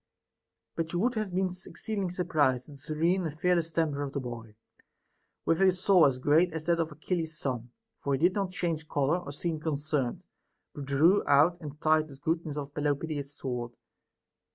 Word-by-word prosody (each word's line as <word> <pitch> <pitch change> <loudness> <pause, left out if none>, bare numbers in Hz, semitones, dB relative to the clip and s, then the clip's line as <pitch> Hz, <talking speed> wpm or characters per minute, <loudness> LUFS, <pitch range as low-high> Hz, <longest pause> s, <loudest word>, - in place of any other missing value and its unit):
But 165 0 -3
you 175 - 0
would 240 +6 +2
have 215 -4 -2
been 185 0 0 0.2
exceedingly 205 -4 -3
surprised 150 -8 +1
at 150 - -12
the - - -12
serene 165 +6 +1
and 155 0 -8
fearless 170 -2 +2
temper 155 -3 0
of 140 -1 -4
the 140 - -1
boy, 115 -4 -7 0.9
with 165 +3 +2
a 190 -1 +6
soul 180 -2 +5
as 130 -2 0
great 155 +7 +3
as 160 -1 -4
that 170 0 +2
of 165 -1 0
Achil 155 +4 -3
les's 160 -1 -4
son; 125 -3 -3 0.3
for 140 -1 +1
he - - -3
did 175 +4 +4
not 195 -2 -1
change 165 -4 -2
color 145 +5 +1
or 175 - -8
seem 160 +2 -3
concerned, 150 -4 -1 0.5
but 145 - -6
drew 155 +8 +4
out 155 +5 +4
and 150 -1 -8
tried 155 0 +3
the 140 - -12
goodness 160 +1 -2
of 145 -1 -5
Pelopidas's 145 -1 -2
sword. 120 -2 -4
155 Hz, 190 wpm, -29 LUFS, 140-175 Hz, 0.9 s, a